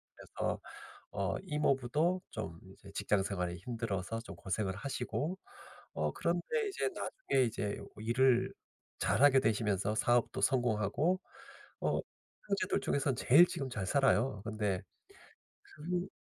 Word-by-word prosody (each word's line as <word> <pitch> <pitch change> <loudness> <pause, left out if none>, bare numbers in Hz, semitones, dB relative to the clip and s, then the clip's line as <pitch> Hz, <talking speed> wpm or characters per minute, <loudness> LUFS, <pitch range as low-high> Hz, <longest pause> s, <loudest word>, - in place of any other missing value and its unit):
그래서 - - -3 0.5
어 100 -1 -1
이모부도 150 +2 +1
좀 85 -7 -5
이제 100 - -14
직장 100 -1 +1
생활이 90 -3 -2
힘들어서 115 0 -3
좀 120 - -9
고생을 95 0 -2
하시고 140 - -3 0.6
어 75 -1 0
그런데 295 - 0
이제 395 +2 -1
나중에 135 - 0
이제 105 -3 -2 0.2
일을 120 +3 +3 0.5
잘 - - +1
하게 135 -2 +7
되시면서 105 -2 +1
사업도 120 +1 +2
성공하고 125 - +2 0.6
어 - - +1 0.5
형제들 200 -1 +1
중에서 140 -1 +1
제일 145 +8 +7
지금 135 -6 -4
잘 105 -6 -3
살아요. 130 -4 +3
근데 105 -4 -1 0.8
그 175 +4 -3
120 Hz, 265 characters per minute, -33 LUFS, 100-145 Hz, 0.8 s, 하게